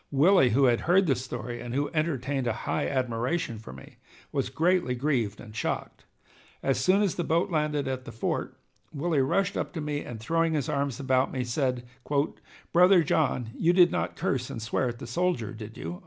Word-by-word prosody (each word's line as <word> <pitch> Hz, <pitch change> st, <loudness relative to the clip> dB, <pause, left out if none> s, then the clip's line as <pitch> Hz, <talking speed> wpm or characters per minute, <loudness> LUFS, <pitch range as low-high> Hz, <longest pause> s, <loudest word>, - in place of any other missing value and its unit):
Willie, 145 Hz, 0 st, +5 dB
who 130 Hz, +5 st, +3 dB
had 120 Hz, -3 st, +4 dB
heard 190 Hz, +2 st, +5 dB
the 145 Hz, -, +3 dB
story 120 Hz, -2 st, -5 dB
and 120 Hz, 0 st, -5 dB
who 145 Hz, +1 st, 0 dB
entertained 140 Hz, -4 st, -1 dB
a 115 Hz, -, +1 dB
high -, -, 0 dB
admiration 125 Hz, 0 st, -1 dB
for 110 Hz, -, -10 dB
me, 65 Hz, +1 st, -13 dB, 0.3 s
was -, -, -1 dB
greatly 175 Hz, -6 st, +1 dB
grieved 120 Hz, -6 st, -1 dB
and 110 Hz, -2 st, -11 dB
shocked. -, -, -3 dB, 0.6 s
As 135 Hz, -, +1 dB
soon 195 Hz, +3 st, +3 dB
as 200 Hz, -, +1 dB
the 175 Hz, -, -2 dB
boat 170 Hz, +4 st, +1 dB
landed 150 Hz, -3 st, 0 dB
at 130 Hz, -1 st, -3 dB
the -, -, -7 dB
fort, 115 Hz, -, -3 dB, 0.3 s
Willie 150 Hz, 0 st, 0 dB
rushed 185 Hz, +8 st, +1 dB
up -, -, -3 dB
to 170 Hz, -, -4 dB
me, 150 Hz, -1 st, -2 dB
and 115 Hz, -2 st, -7 dB
throwing 165 Hz, +7 st, +1 dB
his 150 Hz, -4 st, -1 dB
arms 140 Hz, -4 st, -1 dB
about 130 Hz, -1 st, +1 dB
me, 130 Hz, -2 st, -2 dB
said: 125 Hz, 0 st, -1 dB, 0.9 s
"Brother 180 Hz, 0 st, +6 dB
John, 130 Hz, -7 st, 0 dB
you 170 Hz, +2 st, +3 dB
did 180 Hz, -1 st, +6 dB
not -, -, -2 dB
curse 125 Hz, -2 st, -1 dB
and -, -, -5 dB
swear 115 Hz, +3 st, -1 dB
at 120 Hz, -, -6 dB
the -, -, -8 dB
soldier, 120 Hz, -, -1 dB
did 110 Hz, 0 st, -9 dB
you?" 85 Hz, +2 st, -6 dB
135 Hz, 200 wpm, -27 LUFS, 120-165 Hz, 0.9 s, Brother